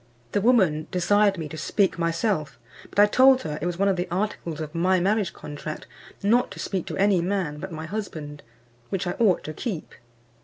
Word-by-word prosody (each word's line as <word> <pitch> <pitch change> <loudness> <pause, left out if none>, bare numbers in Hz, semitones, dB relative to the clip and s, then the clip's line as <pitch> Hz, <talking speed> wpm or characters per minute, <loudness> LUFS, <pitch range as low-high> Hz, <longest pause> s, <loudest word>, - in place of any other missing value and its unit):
The 205 - +1
woman 185 -10 +3
desired 200 +2 +3
me 160 -2 -4
to 155 - -7
speak 190 +3 +1
myself; 165 -1 -1 0.3
but - - -14
I 205 - +8
told 260 +4 +5
her 150 -1 -4
it 175 - -1
was 175 -1 -3
one 200 +1 +2
of 195 -2 +2
the 175 - -1
articles 175 -4 -3
of 155 -1 -5
my 180 +2 +2
marriage 200 +2 +1
contract 150 +1 -7 0.4
not 235 +5 +3
to - - -11
speak 190 -4 -3
to - - -4
any 195 -2 +3
man 175 -5 -2
but 190 +2 -6
my 160 0 -6
husband, 155 -7 -6 0.5
which 195 -1 -2
I 175 - -1
ought 205 -7 +3
to 155 - -6
keep. 185 - -5
185 Hz, 200 wpm, -25 LUFS, 160-205 Hz, 0.5 s, I